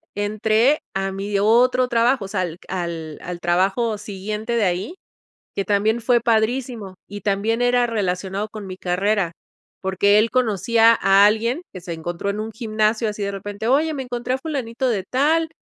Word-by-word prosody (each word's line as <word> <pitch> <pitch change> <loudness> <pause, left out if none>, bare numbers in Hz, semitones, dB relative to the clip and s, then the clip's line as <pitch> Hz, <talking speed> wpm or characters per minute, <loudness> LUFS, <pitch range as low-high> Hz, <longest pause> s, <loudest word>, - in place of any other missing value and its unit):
entré 215 +6 +2 0.2
a 195 0 -1
mi 200 +1 -2
otro 245 +4 +4
trabajo. 235 -1 +2
o - - -6
sea, 195 -1 -2
al 170 -2 -4
q - - -20
al 170 -4 -4
al 180 0 -6
trabajo 195 +6 +1
siguiente 210 +2 -5
de 225 - +2
ahí, 185 - -2 0.6
que 200 - 0
también 215 +3 +1
fue 240 +1 +3
padrísimo, 225 -2 0
y 205 0 -8
también 210 +4 0
era 245 0 +3
relacionado 195 -2 -2
con 215 -1 -8
mi 185 -1 -7
carrera 190 0 0 0.5
porque 200 +2 +3
él 225 +2 +2
conocía 230 -1 +3
a 195 +1 +6
alguien 230 +9 +1
que 185 - -8
se 170 -1 -6
encontró 170 +4 -4
en 200 +1 -3
un 220 +1 -4
gimnasio 215 0 0
así 210 0 -5
de 200 - -2
repente, 205 +2 -5
"oye, 300 +5 +2
me 270 - -3
encontré 245 0 -3
a - - -3
fulanito 265 -4 -3
de 205 -5 -1
tal 310 - +1
215 Hz, 180 wpm, -21 LUFS, 195-235 Hz, 0.6 s, a